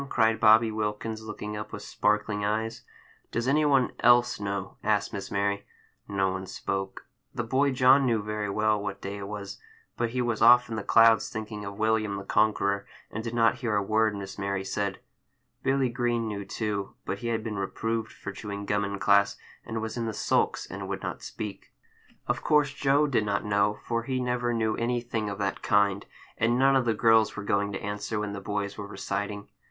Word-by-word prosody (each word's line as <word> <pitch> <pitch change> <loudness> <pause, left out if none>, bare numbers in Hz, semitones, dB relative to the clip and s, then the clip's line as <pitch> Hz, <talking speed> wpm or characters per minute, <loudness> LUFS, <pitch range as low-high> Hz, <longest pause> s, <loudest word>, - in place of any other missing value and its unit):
cried 110 -1 +2
Bobby 110 0 +6
Wilkins, 110 +1 -3
looking 105 -1 -6
up 105 0 -6
with 105 - -7
sparkling 105 0 0
eyes. 110 +2 -1 0.5
"Does 120 +2 -1
any 150 +3 +3
one 135 -4 +3
else 120 0 +4
know?" 100 -2 -4
asked 105 -1 +1
Miss 100 - -5
Mary. 100 0 0 0.4
No 95 -2 0
one 95 0 -5
spoke. 95 +1 -4 0.3
The 120 - -1
boy 135 +5 +2
John 130 +1 +5
knew 115 -3 +1
very 105 -1 -3
well 105 +1 +1
what 100 -1 -4
day 100 +1 -5
it 100 - -6
was, 100 -1 -7 0.4
but 120 - 0
he 125 +2 -3
was 120 -3 -1
off 120 +1 +7
in 115 - -3
the 110 - -2
clouds, 115 +2 +5
thinking 110 -2 -6
of 100 0 -7
William 110 -2 +1
the 95 - -6
Conqueror, 100 -1 +1 0.2
and 110 - -4
did 115 0 -4
not 115 -1 +3
hear 115 -5 -1
a 100 - +2
word 110 +1 +2
Miss 100 0 -7
Mary 100 -1 -2
said. 100 0 -2 0.6
Billy 135 -1 +2
Green 120 -1 -1
knew, 100 -2 -4
too, 100 -1 -3
but 100 - -3
he 120 - -4
had 115 -1 -1
been 105 -3 -4
reproved 110 +3 -2
for 100 - -7
chewing 100 0 -6
gum 105 0 +1
in 100 0 -3
class, 100 +1 +3 0.3
and 110 0 -4
was 110 +2 -4
in 115 -1 -2
the 110 - -3
sulks, - - +1
and - - -7
would - - -4
not - - -4
speak. 105 -2 -7 0.5
Of - - -1
course 150 -2 +3
Joe 140 +1 +3
did 130 -7 +1
not 100 -1 -1
know, 105 0 +2
for 115 -1 -1
he 130 +2 -2
never 125 -1 0
knew 110 -2 0
anything 120 -2 -1
of 100 - -5
that 100 -2 -2
kind; 100 -1 +2 0.3
and 115 +2 +2
none 135 +1 +4
of 130 -2 +3
the 115 -2 +1
girls 110 0 +4
were 100 - -5
going 100 0 0
to - - -5
answer 105 +1 -3
when 105 -1 -3
the 100 - -6
boys 100 +1 -3
were 100 - -5
reciting. 100 +1 -4
110 Hz, 205 wpm, -27 LUFS, 100-115 Hz, 0.6 s, off